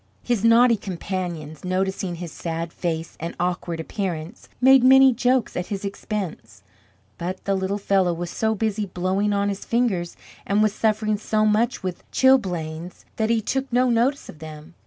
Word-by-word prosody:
His 240 -4 0
naughty 230 0 +6
companions 175 -5 -5
noticing 185 0 -1
his 170 -1 -7
sad 165 0 -4
face 165 -2 -3
and 170 +2 -5
awkward 175 -1 -2
appearance, 175 +2 -5
made 265 0 +6
many 265 0 +7
jokes 250 0 +1
at 180 - -3
his 200 -1 -4
expense; 170 - -5 0.6
but 185 +2 -5
the 200 - +1
little 190 +1 -1
fellow 195 -3 +2
was 170 0 -4
so 220 0 0
busy 215 -1 -1
blowing 185 +3 0
on 200 0 +1
his 200 0 -4
fingers, 215 -8 -1 0.3
and 205 +2 +2
was 215 -2 +2
suffering 215 -1 +1
so 215 +1 0
much 215 +2 +1
with 185 -2 -4
chilblains, 180 -10 +1
that 220 0 0
he 230 -1 +2
took 265 +5 -2
no 250 +1 +3
notice 250 +5 +1
of 165 -7 -12
them. 155 +1 -10
195 Hz, 165 wpm, -23 LUFS, 175-225 Hz, 0.6 s, many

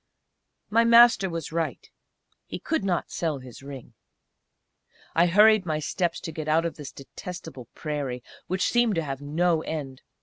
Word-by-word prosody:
My 230 +2 +4
Master 230 -4 +6
was 165 -2 -5
right. 165 0 -3 0.6
He - - -5
could 320 -9 -2
not 180 -3 -1
sell 160 -4 -2
his 130 -2 -12
ring. 135 -2 -10 1.2
I 170 +2 +4
hurried 210 +3 +6
my 155 -4 -1
steps 170 +3 -2
to 165 - -5
get 155 -1 -6
out 160 +2 +2
of 170 - -3
this 145 -2 -8
detestable 135 -2 -9
prairie, 140 -5 -4 0.2
which 185 +1 0
seemed 240 -4 +3
to 165 - 0
have 135 -2 -5
no 160 +3 +1
end. 140 -5 -5
165 Hz, 160 wpm, -26 LUFS, 145-185 Hz, 1.2 s, Master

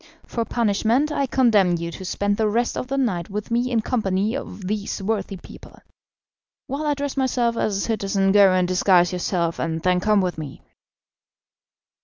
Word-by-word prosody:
For 230 -1 -3
punishment 230 +6 +1
I 280 -2 0
condemn 215 -9 +3
you 170 0 -5
to 190 - -9
spend 205 +2 -1
the 220 +1 +1
rest 235 +3 0
of - - -4
the 275 +1 -2
night 190 -11 -1
with 210 +3 -5
me 240 +2 +1
in 235 -3 +1
company 215 -2 -1
of 200 -8 -7
these 210 +1 -3
worthy 200 -1 -2
people. - - -14 0.9
While 290 +3 -3
I 295 - +1
dress 285 -1 -4
myself 250 -3 0
as 205 -3 -1
a - - -2
citizen, 195 -3 0
go 200 -1 +6
and 185 -1 +2
disguise 180 -1 +3
yourself, 175 -2 -1
and 165 0 -2
then 180 0 +2
come 210 +2 +2
with 180 -3 -1
me." 145 -4 -8
205 Hz, 180 wpm, -22 LUFS, 185-235 Hz, 0.9 s, go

